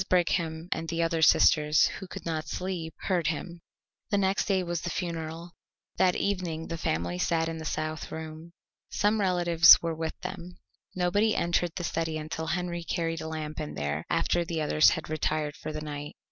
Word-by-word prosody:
Brigham 170 -2 +1
and 165 0 -2
the 170 0 0
other 165 -1 0
sisters, 150 -1 +5
who 190 - -8
could - - -9
not 160 -2 -2
sleep, 180 -4 -4
heard 175 -5 0
him. 170 +2 -4 0.5
The 205 - +2
next 195 0 +1
day 190 -2 +1
was 175 -1 -3
the 175 - -3
funeral. 165 -1 -4 0.5
That 180 -1 +3
evening 175 -5 -2
the 165 - -3
family 85 - -1
sat 165 - +1
in 165 0 -4
the 160 - -7
south 155 +1 -3
room. 160 +1 -7 0.4
Some 210 +1 +1
relatives 175 -3 +7
were 165 -1 -2
with 160 0 -4
them. 175 +1 -7 0.4
Nobody 200 +5 +2
entered 170 0 0
the 175 - -4
study 165 -1 -2
until 160 +1 -5
Henry 175 0 -2
carried 165 -1 -2
a 160 - -5
lamp 155 -1 -5
in 150 -1 -5
there 75 +1 -2
after 175 - +1
the 165 -1 -3
others 155 0 +5
had 160 - -3
retired 155 -1 -1
for 155 - -6
the 155 0 -5
night. 145 -1 -6
165 Hz, 185 wpm, -28 LUFS, 155-175 Hz, 0.5 s, relatives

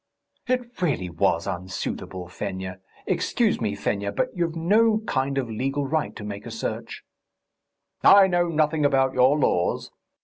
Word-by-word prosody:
"It 245 -4 -2
really 130 - 0
was 85 0 +1
unsuitable, 90 0 -5
Fenya.... 95 0 -5 0.3
Excuse - - +1
me, - - -1
Fenya, 100 0 -2
but 100 - -1
you've 170 -2 -1
no 215 +6 +3
kind 135 -9 -1
of 130 -3 0
legal 135 +6 -2
right 155 +2 -1
to 105 - -8
make 100 -1 -6
a - - -5
search." - - -5 1.0
"I 200 -1 +8
know 175 -2 +1
nothing 155 -1 +1
about 135 -2 +3
your 130 +4 +4
laws. 90 -11 0
135 Hz, 145 wpm, -24 LUFS, 100-170 Hz, 1.0 s, I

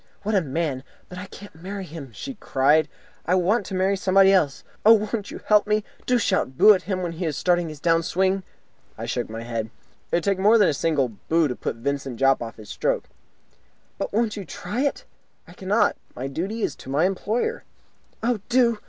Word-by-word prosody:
"What 215 +2 -1
a 195 - +4
man! 145 -3 -2 0.3
But 180 - -8
I 190 - -7
can't 205 +2 -12
marry 190 +4 -7
him," 150 -6 -9
she 270 - -7
cried. 150 - +2 0.4
"I 180 - +3
want 190 +3 +1
to 190 - -4
marry 190 +2 +2
somebody 195 0 +4
else. 155 -8 +1 0.2
Oh, 220 - +9
won't 215 -1 -1
you - - -7
help 210 -1 +4
me? 210 0 +1 0.2
Do 250 - +4
shout 130 - 0
'Boo!' 215 - +8
at 185 - -1
him 185 -1 -3
when 175 - -2
he 170 +2 -4
is 155 -3 -2
starting 175 -2 +1
his 155 -2 -9
down 165 +1 +3
swing!" 190 +3 +1 0.6
I - - -5
shook - - -2
my 115 +1 -6
head. 115 -2 -3 0.4
"It - - +2
would 170 - +1
take 200 -2 +1
more 210 +4 +6
than 205 -4 +5
a - - +1
single 145 -3 +1 0.2
'boo' 165 -1 +4
to 125 - -3
put - - -4
Vincent 135 +1 -3
Jopp 135 0 +4
off 115 -1 -6
his 110 -2 -12
stroke." - - -1 0.9
"But - - -3
won't 220 0 0
you 205 - -5
try 205 - -4
it?" 285 0 -1 0.4
"I - - -13
cannot. 205 +4 +1 0.2
My 130 - -5
duty 190 +11 -3
is - - -1
to - - -11
my 145 +5 +2
employer." 220 - -1 0.6
"Oh, 235 -1 +1
do!" 240 -3 +3
185 Hz, 215 wpm, -24 LUFS, 150-205 Hz, 0.9 s, Oh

